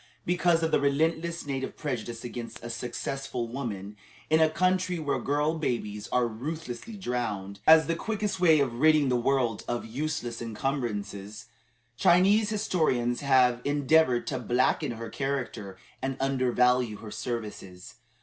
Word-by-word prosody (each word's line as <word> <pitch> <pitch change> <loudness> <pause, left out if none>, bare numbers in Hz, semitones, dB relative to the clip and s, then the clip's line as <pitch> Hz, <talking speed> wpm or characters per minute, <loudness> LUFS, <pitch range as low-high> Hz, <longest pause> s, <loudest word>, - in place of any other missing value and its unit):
Because 175 -1 +2
of 160 - +1
the - - +4
relentless 160 +4 0
native 135 -2 -4
prejudice 120 -5 -4
against 120 -2 -7
a 120 - -5
successful 125 +1 -4
woman, 105 -5 -5 0.3
in 160 0 +5
a 160 - +5
country 185 +2 +1
where 150 -3 -1
girl 150 +3 0
babies 105 -7 -3
are 125 -1 +1
ruthlessly 150 - -6
drowned, 105 - -3
as 160 0 +8
the 165 - 0
quickest 210 0 -2
way 160 -4 +5
of 120 -4 -1
ridding 155 -2 +5
the 125 - +2
world 120 -3 +1
of 120 -1 -2
useless 120 -1 -3
incumbrances, 105 -4 -4 0.5
Chinese 195 - +4
historians 155 - 0
have 130 -3 +3
endeavored 145 -2 +3
to 130 - -2
blacken 125 0 +1
her 115 -1 -7
character 120 -8 -3 0.2
and 135 0 -2
undervalue 125 -3 +2
her 105 0 -9
services. 105 -5 -6
130 Hz, 140 wpm, -28 LUFS, 115-155 Hz, 0.5 s, as